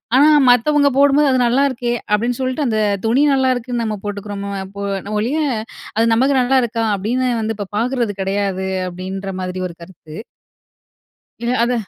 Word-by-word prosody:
ஆனா, 290 +4 +6 0.2
மத்தவங்க 285 +4 +4
போடும்போது 285 +1 +4
அது 255 - +2
"நல்லாயிருக்கே" 250 -1 +1 0.2
அப்டின்னு 235 +4 0
சொல்ட்டு, 260 +3 -1
அந்த 220 -2 0 0.3
துணி 250 +6 +3
நல்லாருக்குன்னு 255 -2 0
நம்ம 215 -1 -2
போட்டுக்கிறோமோ 200 0 -5 0.3
போ 200 - -4 0.2
ந - - -5
ஒழிய, 245 +9 -1 0.6
"அது 225 - +4
நமக்கு 265 +5 +2
நல்லாயிருக்கா" 245 -3 +1
அப்படின்னு 245 +6 -1
வந்து 220 0 -2
இப்போ 205 -2 -5
பாக்குறது 240 -2 0
கிடையாது, 195 -1 -1 0.2
அப்படின்ற 190 +2 -6
மாதிரி 185 0 -4
ஒரு 170 - -11
கருத்து. 170 -3 -13 1.3
இல்ல, 240 +1 0
அது 245 +1 0
235 Hz, 145 wpm, -18 LUFS, 200-260 Hz, 1.3 s, ஆனா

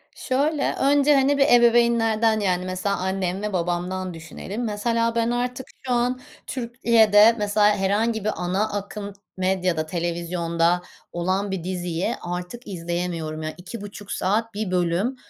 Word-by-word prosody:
Şöyle, 285 +3 0
önce, 285 +1 +4
hani, 275 +1 +3
bir 275 - +5
ebeveynlerden 235 -3 +4
yani 185 -3 0
mesela 185 +2 -1
annem 190 0 -2
ve 210 -1 -3
babamdan 180 +1 -2
düşünelim. 175 +7 -6
Mesela 230 +2 0
ben 230 0 +1
artık 250 +1 -2 0.2
şu 255 - 0
an 245 +1 +1 0.3
Türkiye'de 230 -3 +4
mesela 210 0 +3
herhangi 210 +3 0
bir 215 - +1
ana 190 +5 -1
akım 205 0 -5 0.2
medyada 185 -4 0
televizyonda 170 0 0 0.3
olan 190 +3 -1
bir 190 -4 -3
diziyi 180 +3 -2
artık 180 +7 -6
izleyemiyorum 170 -3 -3
ya 155 0 -4
2,5 205 +2 -9
saat 220 +4 0
bir 210 -2 -3
bölüm 180 +7 0
200 Hz, 135 wpm, -23 LUFS, 180-230 Hz, 0.3 s, bir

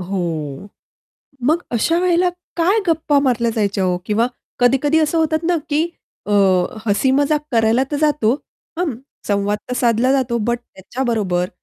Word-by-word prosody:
हो. 170 -5 -4 0.8
मग 310 +7 +2
अशा 250 +8 +1
वेळेला 360 0 +2 0.3
काय 375 +6 +3
गप्पा 315 -3 +2
मारल्या 240 -4 +1
जायच्या 200 -3 0
हो? 180 -1 +1
किंवा 220 +4 +1 0.3
कधी-कधी 270 +5 +3
असं 310 +1 +1
होतात 315 0 +1
ना 350 +1 +2
की 310 +3 +1 0.4
अ, 210 - -4 0.5
हसी-मजाक 275 +7 +2
करायला 230 +1 +3
तर 290 - 0
जातो, 295 -7 +2 0.5
हं, 345 -6 0 0.3
संवाद 205 0 0
तर - - -1
साधला 240 +1 +2
जातो 255 -3 +1
बट 240 - +1
त्याच्याबरोबर 205 -5 -2
245 Hz, 140 wpm, -19 LUFS, 210-305 Hz, 0.8 s, काय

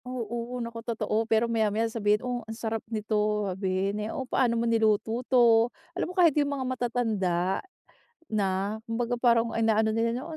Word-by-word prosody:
Oo, 240 0 -4
naku 230 0 -7
totoo. 225 -1 -2
Pero 225 +1 +3
maya-maya 225 -1 +1
sabihin, 215 0 0
"Oh 245 -1 -2
ang 225 - -6
sarap 225 -2 -3
nito", 210 -1 0
sabihin 190 +2 -1
eh, 210 - -3
"Oh 260 - -4
paano 245 -2 +1
mo 230 - 0
niluto 225 0 +1
'to?" 235 -2 +5 0.2
Alam - - -2
mo - - -7
kahit 340 -4 +6
yung 285 - 0
mga 260 - -3
matatanda 215 -8 0 0.7
na, 200 0 -1
kumbaga 235 +1 -2
parang 235 -1 +3
inaano 220 -1 +2
nila 225 +1 +1
na, 295 - -8
"Oh 320 - -6
225 Hz, 175 wpm, -27 LUFS, 210-240 Hz, 0.7 s, kahit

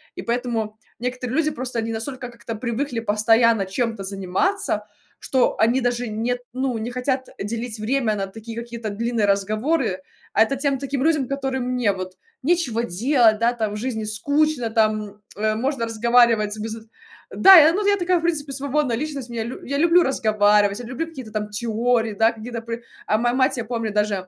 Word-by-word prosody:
И - - -5
поэтому 235 -2 -1 0.3
некоторые 250 +1 -3
люди, 310 -1 +2
просто 250 -3 -4
они 225 0 -2
настолько 250 +3 -5
как-то 235 -1 -8
привыкли 235 +2 -3
постоянно 225 0 +3
чем-то 225 +1 -2
заниматься, 195 - -1 0.4
что 260 -2 +1
они 235 +4 +3
даже 245 0 -1
нет, 230 +3 -2
ну, 255 -2 -1
не 220 +2 -4
хотят 260 +1 -2
делить 230 +2 -4
время 225 0 0
на 195 -1 -3
такие 225 +3 -9
какие-то 235 -1 -5
длинные 230 +1 -1
разговоры, 215 - 0 0.4
а - - +3
это 250 +5 -1
тем, 280 -2 +1
таким 275 0 -3
людям, 305 -5 +2
которым 270 -1 -2
мне 250 -4 +1
вот 185 -1 -6 0.3
нечего 275 -8 +1
делать, 230 +2 +3
да, 230 +1 +3
там, 220 -3 -2
в - - -4
жизни 220 -1 -3
скучно, 280 +4 0
там, 215 -2 0 0.2
э, 215 +2 0
можно 260 +1 -1
разговаривать 230 -2 +3
без 220 +1 -4 0.6
да. 385 -3 +9
Я, 315 +2 +6
ну, 410 +2 -1
я 405 - +4
такая 360 -1 +1
в - - -7
принципе 305 -4 -1
свободная 275 -2 0
личность, 280 -4 -5
мне 235 -1 -3
лю 245 - -6
я 280 +2 -2
люблю 340 +3 +5
разговаривать, 210 -4 +2
я 245 - -7
люблю 260 +7 -3
какие-то 260 -9 -9
там 210 -1 -3
теории, 225 +1 0
да, 225 +3 +3
какие-то 230 +1 -6
пры 230 +1 -6 0.2
а 215 - +2
моя 240 +2 +1
мать, 260 +1 +2
я 235 - -3
помню 230 -1 -3
даже, 205 -3 -1
235 Hz, 185 wpm, -22 LUFS, 215-265 Hz, 0.6 s, да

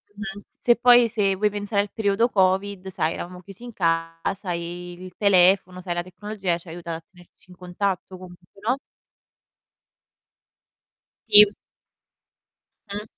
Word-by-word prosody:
mh-mh, 205 -1 -7 0.2
se 240 - +4
poi 245 -1 +6
se 205 -4 0
vuoi 210 +2 +1
pensare 205 0 -1
al 205 - -10
periodo 220 +2 +1
Covid, 190 -1 0
sai, 170 -4 -1
eravamo 180 +1 -7
chiusi 195 +4 -14
in 245 - -8
casa 165 +1 -2
e 175 +1 -5
il 180 +1 -11
telefono, 185 -2 +3
sai, 180 -1 -4
la 175 - -2
tecnologia 190 -1 -4
ci 175 - -18
ha 160 - -8
aiutat 170 -1 -6
a - - -53
tenerci 180 0 -22
in - - -14
contatto 185 +1 -4
comunque, 180 +1 -15
no? 255 +3 +2 2.5
Sì. 210 0 +9 1.4
Mh. 205 +1 -5
190 Hz, 140 wpm, -23 LUFS, 175-205 Hz, 2.5 s, Sì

